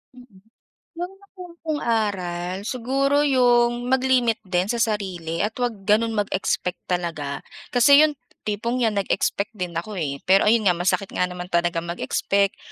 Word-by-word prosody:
Mm. 245 Hz, -6 st, -17 dB, 0.5 s
'Yong 355 Hz, +2 st, -5 dB
nakuha 375 Hz, -3 st, -13 dB
kong 310 Hz, -2 st, -1 dB
aral 185 Hz, -6 st, -1 dB
siguro 275 Hz, +4 st, +1 dB
'yong 245 Hz, -2 st, +3 dB
mag-limit 255 Hz, -3 st, +2 dB
din 180 Hz, 0 st, 0 dB
sa 240 Hz, -, 0 dB
sarili 185 Hz, -7 st, -2 dB
at 210 Hz, +1 st, -1 dB
huwag 245 Hz, -2 st, 0 dB
gano'n 225 Hz, +2 st, +3 dB
mag-expect 195 Hz, -3 st, -1 dB
talaga. 165 Hz, -6 st, -3 dB, 0.3 s
Kasi 280 Hz, +5 st, +7 dB
'yong, 305 Hz, -1 st, +2 dB, 0.3 s
tipong 230 Hz, +4 st, -2 dB
‘yan 220 Hz, -3 st, +1 dB
nag-expect 200 Hz, +1 st, -1 dB
din 180 Hz, -4 st, -4 dB
ako, 190 Hz, +6 st, -5 dB
eh, 140 Hz, -3 st, -2 dB
pero 195 Hz, +2 st, +5 dB
ayun 225 Hz, -2 st, +3 dB
nga, 180 Hz, -, +5 dB
masakit 185 Hz, +3 st, -1 dB
nga 180 Hz, -, 0 dB
naman 180 Hz, 0 st, -6 dB
talaga 175 Hz, -1 st, 0 dB
mag-expect. 185 Hz, +3 st, 0 dB
210 Hz, 150 wpm, -23 LUFS, 180-245 Hz, 0.5 s, Kasi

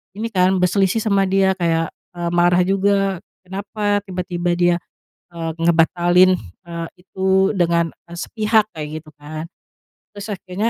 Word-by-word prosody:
ini 225 Hz, +2 st, -3 dB
kan, 185 Hz, -1 st, +3 dB
berselisih 195 Hz, +4 st, +2 dB
sama 200 Hz, -3 st, +2 dB
dia 190 Hz, 0 st, +3 dB
kayak, 165 Hz, -1 st, +1 dB, 0.2 s
eee, 170 Hz, -1 st, -2 dB
marah 175 Hz, +1 st, +4 dB
juga, 195 Hz, 0 st, +1 dB, 0.2 s
kenapa 205 Hz, +2 st, -2 dB
tiba-tiba 180 Hz, -1 st, -2 dB
dia, 175 Hz, 0 st, +3 dB, 0.6 s
eee, 165 Hz, -1 st, -3 dB
ngebatalin, 175 Hz, +2 st, +4 dB, 0.3 s
eee, 170 Hz, -1 st, -4 dB
itu 190 Hz, +1 st, +1 dB
dengan 170 Hz, -1 st, +2 dB, 0.2 s
sepihak, 215 Hz, +4 st, +1 dB
kayak 155 Hz, 0 st, -5 dB
gitu 155 Hz, -, -16 dB
kan? 155 Hz, +2 st, -7 dB, 0.7 s
Terus 205 Hz, +1 st, -7 dB
akhirnya, 195 Hz, +4 st, -2 dB
180 Hz, 130 wpm, -20 LUFS, 170-195 Hz, 0.7 s, marah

